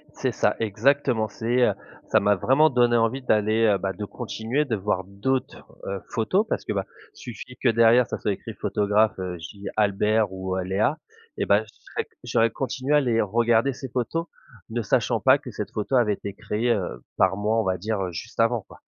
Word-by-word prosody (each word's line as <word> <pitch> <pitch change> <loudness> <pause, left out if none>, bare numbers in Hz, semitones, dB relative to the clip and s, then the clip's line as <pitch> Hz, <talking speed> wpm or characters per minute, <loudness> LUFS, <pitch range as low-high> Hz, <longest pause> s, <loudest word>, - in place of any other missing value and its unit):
C'est - - -1
ça, - - +1
exactement. 115 +2 +1
C'est, 115 +4 -1
heu, 105 -5 +4 0.3
ça 110 - +4
m'a 105 0 +3
vraiment 135 - +4
donné 120 -3 +3
envie 115 +4 +1
d'aller, 110 -1 +2
heu, 100 -2 +4
bah, 95 0 -3
de 105 +3 -5
continuer 120 +6 -2
de 120 -5 -1
voir 95 -2 -1
d'autres, 100 +8 -2 0.3
heu, 95 -1 -4
photos 185 - +1
parce - - -2
que, - - -2
bah, 95 -1 -2 0.3
suffit 125 +2 -9
que 130 - +2
derrière 115 +1 +5
ça - - -4
soit 105 - -1
écrit - - -8
photographe, 105 +1 +1
heu, 90 -1 -4
je 80 +5 -10
dis 100 - -8
Albert 105 0 +2
ou, 95 0 -3
heu, 95 - -1
Léa 100 - 0 0.4
et - - +1
bah, 100 +2 +4
je - - -18 0.3
serais - - -2 0.2
j'aurais 115 0 +2
continué 135 +4 -1
à - - +6
les 120 -4 +1
regarder 115 +5 +2
ces 130 +1 -8
photos 130 +8 -2 0.5
ne 120 - -1
sachant 105 - +1
pas - - +5
que - - -10
cette - - -5
photo 110 +5 -2
avait 115 -4 +3
été 100 0 -7
créé, 110 +3 -1
heu, 95 -6 -2
par 95 +1 +3
moi, 110 +2 +1
on - - +1
va 95 -2 0
dire, 105 +2 -2
heu, 90 -2 -2
juste 95 +9 -8
avant, 115 0 +3
quoi. - - -15
110 Hz, 210 wpm, -25 LUFS, 100-120 Hz, 0.5 s, à